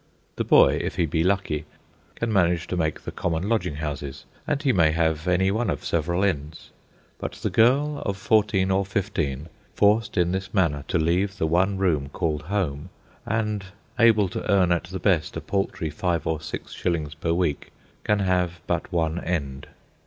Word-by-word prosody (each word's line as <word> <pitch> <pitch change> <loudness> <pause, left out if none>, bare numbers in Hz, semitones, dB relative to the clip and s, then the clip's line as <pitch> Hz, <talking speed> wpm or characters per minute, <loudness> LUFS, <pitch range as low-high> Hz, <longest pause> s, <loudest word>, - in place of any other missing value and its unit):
The - - -1
boy, - - +5
if - - -3
he 85 -2 +2
be 80 +1 0
lucky, 90 -5 0 0.5
can 115 -1 -2
manage 90 -3 +2
to - - -1
make 80 -3 -1
the - - -6
common 85 +1 -2
lodging 90 -9 0
houses, 70 -2 -5 0.2
and 150 -2 0
he 135 -4 +3
may 80 -5 +4
have 80 0 0
any 95 +2 +3
one 110 +1 0
of 75 - -3
several 85 +3 0
ends. 80 -5 -2 0.5
But - - -4
the 105 0 -3
girl 135 +8 +3
of 100 -1 -2
fourteen 100 -2 +2
or 95 +1 +2
fifteen, 80 -7 -2 0.3
forced 105 +1 +2
in 90 -1 +3
this 95 +2 -4
manner 75 -7 +1
to - - +1
leave 90 +5 +1
the 80 - 0
one 95 +5 +2
room 80 -8 +1
called 75 0 -2
home, 80 -3 -2 0.4
and 105 -2 -1 0.4
able 110 -4 +5
to - - -3
earn 95 -3 +4
at 85 0 +1
the 95 +2 -6
best 85 -5 +1
a - - -1
paltry 95 -5 -2
five 85 0 -1
or 80 -1 -1
six 75 -2 -7
shillings 80 -4 -2
per 85 -1 -2
week, 85 -4 -1 0.3
can 105 - +2
have 90 -3 0
but - - -2
one 80 -1 0
end. 70 -6 -3
90 Hz, 180 wpm, -24 LUFS, 80-100 Hz, 0.5 s, boy